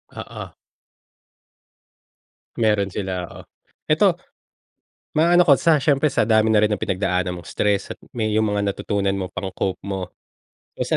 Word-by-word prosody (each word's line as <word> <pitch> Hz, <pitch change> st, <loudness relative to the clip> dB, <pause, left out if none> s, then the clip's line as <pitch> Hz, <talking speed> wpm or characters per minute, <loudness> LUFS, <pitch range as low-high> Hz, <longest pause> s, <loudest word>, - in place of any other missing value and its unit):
Oo. -, -, -7 dB, 2.1 s
Meron 105 Hz, -3 st, +2 dB
sila 95 Hz, -2 st, -4 dB
oo. -, -, -11 dB, 0.4 s
Eto, -, -, +3 dB, 1.0 s
maano 175 Hz, +3 st, +5 dB
ko 140 Hz, -, +8 dB
sa 155 Hz, 0 st, +3 dB
siyempre 145 Hz, +1 st, +2 dB
sa 110 Hz, -, +1 dB
dami 110 Hz, 0 st, +4 dB
na 105 Hz, -, +5 dB
rin 105 Hz, -, +3 dB
ng 105 Hz, -, -1 dB
pinagdaanan 90 Hz, -1 st, -1 dB
mong -, -, -14 dB
stress 100 Hz, -1 st, 0 dB
at -, -, -59 dB
may 110 Hz, -3 st, -1 dB
yung 110 Hz, -1 st, +2 dB
mga 100 Hz, -1 st, 0 dB
natutunan 100 Hz, 0 st, -1 dB
mo 95 Hz, -1 st, -5 dB
pang-cope 95 Hz, 0 st, -3 dB
mo. 95 Hz, -2 st, -4 dB, 0.7 s
So -, -, 0 dB
105 Hz, 140 wpm, -22 LUFS, 95-110 Hz, 2.1 s, ko